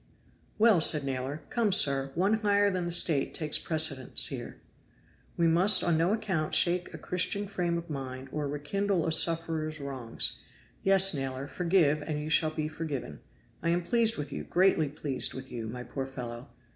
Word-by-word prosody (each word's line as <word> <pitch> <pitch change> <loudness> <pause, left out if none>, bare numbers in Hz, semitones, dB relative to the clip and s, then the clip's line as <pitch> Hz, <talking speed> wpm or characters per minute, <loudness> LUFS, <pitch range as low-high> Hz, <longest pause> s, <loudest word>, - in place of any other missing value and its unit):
"Well 215 -5 +4
said, 150 -2 +5
Naylor. 135 +2 -5
Come, 230 -4 0
sir, 140 -6 +4
One 200 +6 +1
higher 205 -1 +2
than 180 -2 -3
the - - -3
State 160 -5 +3
takes 155 -2 +2
precedence 155 -5 +2
here. - - -8 0.8
We 170 - +1
must 175 +5 +5
on 170 -2 +1
no 165 +4 +1
account 185 -8 -2
shake 175 0 +2
a - - -9
Christian 185 +3 -1
frame 175 -4 -3
of 170 0 -7
mind 135 -3 -7
or 150 -1 -3
rekindle 170 +6 -2
a 165 - -1
sufferer's 160 -1 0
wrongs. 130 -5 -2 0.4
Yes, 195 -1 +5
Naylor, 135 -1 -4
forgive 165 -2 +1
and 150 0 -4
you 150 +1 -6
shall 155 0 +2
be 155 -1 -4
forgiven. 145 - -6 0.4
I 170 - -1
am 175 +1 0
pleased 230 +3 +1
with 145 -1 -6
you, - - -5
greatly 180 -4 +1
pleased 140 -2 0
with 130 0 -9
you, 115 -2 -6
my 125 +2 -7
poor 135 +1 -6
fellow. 125 -1 -8
155 Hz, 175 wpm, -28 LUFS, 140-180 Hz, 0.8 s, said